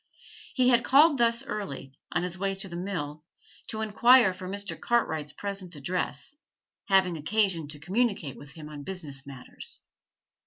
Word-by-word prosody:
He 255 -2 +4
had 240 -1 +5
called 290 +1 +6
thus 235 0 +3
early, 140 -10 -5 0.2
on 175 0 0
his 180 -1 -2
way 195 +1 -1
to 195 +1 -2
the 170 - -8
mill, 160 -5 -4 0.4
to 220 - -3
inquire 235 -1 +5
for 185 0 -8
Mr. 200 0 -3
Cartwright's 160 -11 0
present 195 -3 -4
address 155 - -2 0.5
having 190 -3 +3
occasion 175 -1 +1
to 150 +1 -7
communicate 190 - 0
with 145 -1 -12
him 155 -2 -9
on 150 -1 -8
business 145 -5 -4
matters. 135 -3 -6
185 Hz, 155 wpm, -28 LUFS, 150-215 Hz, 0.5 s, called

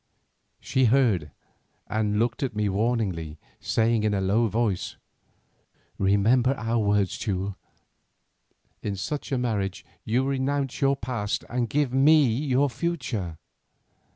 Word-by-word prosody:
She 130 -1 +1
heard 110 - +3 0.6
and 105 -1 -1
looked 120 +2 0
at 130 -6 -2
me 105 0 0
warningly, 95 -7 -1 0.2
saying 115 -1 +1
in 105 -1 +1
a - - 0
low 100 +5 +2
voice: 110 -3 -1 1.0
"Remember 110 +7 +3
our 115 +2 0
words, 100 -2 +1
Teule. 100 -2 -2 1.3
In 100 - -3
such 145 - -4
a 135 - +1
marriage 105 -6 -2 0.2
you 125 +4 +1
renounce 135 0 -1
your 140 0 +3
past 115 -5 -3
and 120 -1 -1
give 145 -3 0
me 145 +3 +6
your 135 +3 +1
future." 120 - -3
115 Hz, 125 wpm, -26 LUFS, 100-130 Hz, 1.3 s, me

